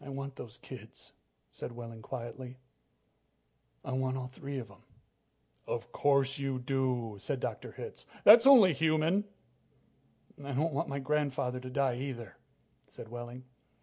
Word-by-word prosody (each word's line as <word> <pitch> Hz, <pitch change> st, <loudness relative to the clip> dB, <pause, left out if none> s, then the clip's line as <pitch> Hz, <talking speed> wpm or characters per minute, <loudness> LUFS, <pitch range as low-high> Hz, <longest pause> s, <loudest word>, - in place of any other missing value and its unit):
"I 140 Hz, -, -9 dB
want 140 Hz, 0 st, -5 dB
those 115 Hz, -6 st, -9 dB
kids," 115 Hz, -4 st, -11 dB, 0.4 s
said -, -, -6 dB
Wehling 115 Hz, -1 st, -8 dB
quietly. 125 Hz, +1 st, -7 dB, 1.3 s
"I -, -, -4 dB
want 130 Hz, 0 st, 0 dB
all 130 Hz, -, -4 dB
three 135 Hz, +2 st, -6 dB
of 120 Hz, -4 st, -5 dB
them." 100 Hz, -, -17 dB, 0.9 s
"Of -, -, -3 dB
course 140 Hz, -1 st, +2 dB
you 135 Hz, -2 st, -1 dB
do," 125 Hz, -4 st, -1 dB
said -, -, -2 dB
Dr. -, -, -4 dB
Hitz. -, -, -8 dB, 0.2 s
"That's 230 Hz, +5 st, +10 dB
only 225 Hz, -11 st, +9 dB
human." 160 Hz, +6 st, +2 dB, 1.2 s
"I 140 Hz, 0 st, -4 dB
don't 155 Hz, +4 st, +1 dB
want 135 Hz, -, -1 dB
my 140 Hz, -, -2 dB
grandfather 135 Hz, -3 st, 0 dB
to 130 Hz, 0 st, -7 dB
die, 130 Hz, -2 st, +1 dB
either," 125 Hz, -5 st, -5 dB, 0.5 s
said 110 Hz, -, -10 dB
Wehling. 120 Hz, +1 st, -7 dB
130 Hz, 145 wpm, -32 LUFS, 125-140 Hz, 1.3 s, That's